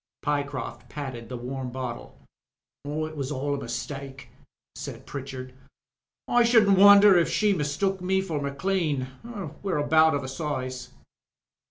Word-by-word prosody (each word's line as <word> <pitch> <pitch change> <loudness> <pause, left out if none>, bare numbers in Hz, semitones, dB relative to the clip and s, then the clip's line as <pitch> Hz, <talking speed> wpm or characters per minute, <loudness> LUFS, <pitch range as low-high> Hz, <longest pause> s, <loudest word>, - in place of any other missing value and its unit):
Pyecroft 145 -3 -3
patted 130 -6 -6
the 125 - -5
warm 130 +1 -5
bottle. 125 -2 -6 0.7
''It 155 +1 -3
was 140 -1 -4
aU 145 +1 -2
a - - -1
mistake/' 135 +2 -6 0.4
said - - -8
Pritchard. 130 -2 -7 0.7
''I 240 0 +4
shouldn't 220 -5 +5
wonder 205 0 +9
if 170 - +1
she 210 -1 +2
mistook 180 +4 -1
me 190 +1 +1
for 165 -6 -3
Maclean. 145 -1 -1 0.6
We're 195 -5 -1
about 155 +1 +4
of 140 - -2
a - - -5
size." 130 -3 -4
145 Hz, 135 wpm, -26 LUFS, 130-185 Hz, 0.7 s, wonder